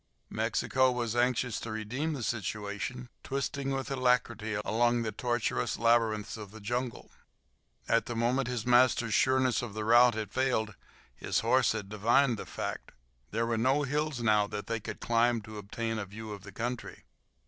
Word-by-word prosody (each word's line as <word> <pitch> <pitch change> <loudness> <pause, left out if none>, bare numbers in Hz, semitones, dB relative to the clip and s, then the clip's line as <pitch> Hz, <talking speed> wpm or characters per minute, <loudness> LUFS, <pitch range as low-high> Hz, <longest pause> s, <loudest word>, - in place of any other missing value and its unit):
Mexico 130 0 +1
was 120 -2 -2
anxious 125 -1 +1
to 115 - -6
redeem 125 +9 -2
the 135 -5 -4
situation, 105 +3 -3 0.2
twisting 140 0 -2
with 135 0 -2
alacrity 125 -4 +1
along 120 +1 +2
the 110 - -2
tortuous 120 +2 -1
labyrinths 115 -2 +2
of 105 -2 -8
the 110 +2 -11
jungle. 120 +3 -3 0.8
At - - +2
the 120 - -4
moment 120 +3 +1
his 125 -2 -3
master's 120 -2 +4
sureness 130 0 +3
of 115 -4 -6
the 110 -1 -3
route 120 +1 +6
had 110 -2 -4
failed 125 -5 0 0.4
his - - -1
horse - - +3
had 105 -3 -4
divined 115 +4 +2
the - - -7
fact. - - -5 0.4
There 115 - 0
were 115 -1 0
no 135 +5 +2
hills 145 -2 -1
now 105 -2 +3
that 105 0 -5
they 115 0 -2
could 105 - -7
climb 120 0 +2
to 105 0 -9
obtain 115 +2 -3
a 100 - -3
view 110 +2 -8
of 100 - -9
the 100 +1 -11
country. 120 +4 -5
115 Hz, 170 wpm, -30 LUFS, 110-125 Hz, 0.8 s, route